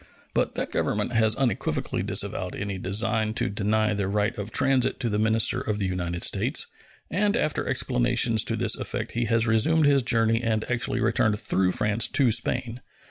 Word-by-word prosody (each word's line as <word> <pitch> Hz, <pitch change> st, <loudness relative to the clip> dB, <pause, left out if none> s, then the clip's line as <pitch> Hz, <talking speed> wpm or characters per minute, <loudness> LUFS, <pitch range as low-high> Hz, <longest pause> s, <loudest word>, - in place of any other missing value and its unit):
But -, -, 0 dB
that -, -, -3 dB
Government 105 Hz, +4 st, -1 dB
has 110 Hz, -1 st, +3 dB
unequivocally 130 Hz, -7 st, -1 dB
disavowed -, -, -2 dB
any 100 Hz, -1 st, -4 dB
design 110 Hz, +3 st, 0 dB
to -, -, -1 dB
deny 105 Hz, +1 st, 0 dB
the 100 Hz, -2 st, -2 dB
right 105 Hz, +3 st, 0 dB
of 105 Hz, +1 st, -6 dB
transit 130 Hz, +2 st, +1 dB
to 120 Hz, -, 0 dB
the 105 Hz, 0 st, -1 dB
minister 110 Hz, 0 st, +2 dB
of 105 Hz, -1 st, -2 dB
the 100 Hz, -, -2 dB
United 90 Hz, -2 st, -3 dB
States, -, -, +1 dB, 0.5 s
and 205 Hz, +5 st, +1 dB
after 155 Hz, -, -1 dB
explanations 120 Hz, -3 st, +1 dB
to -, -, 0 dB
this -, -, +1 dB
effect -, -, -4 dB
he 120 Hz, +1 st, -1 dB
has 115 Hz, 0 st, +1 dB
resumed 145 Hz, +8 st, +3 dB
his 140 Hz, -1 st, +4 dB
journey 115 Hz, -2 st, +1 dB
and 110 Hz, -2 st, -1 dB
actually 125 Hz, -1 st, -1 dB
returned 105 Hz, -1 st, +1 dB
through 95 Hz, -3 st, 0 dB
France 105 Hz, +2 st, +1 dB
to 130 Hz, -5 st, +2 dB
Spain. 120 Hz, +1 st, 0 dB
110 Hz, 180 wpm, -25 LUFS, 105-120 Hz, 0.5 s, his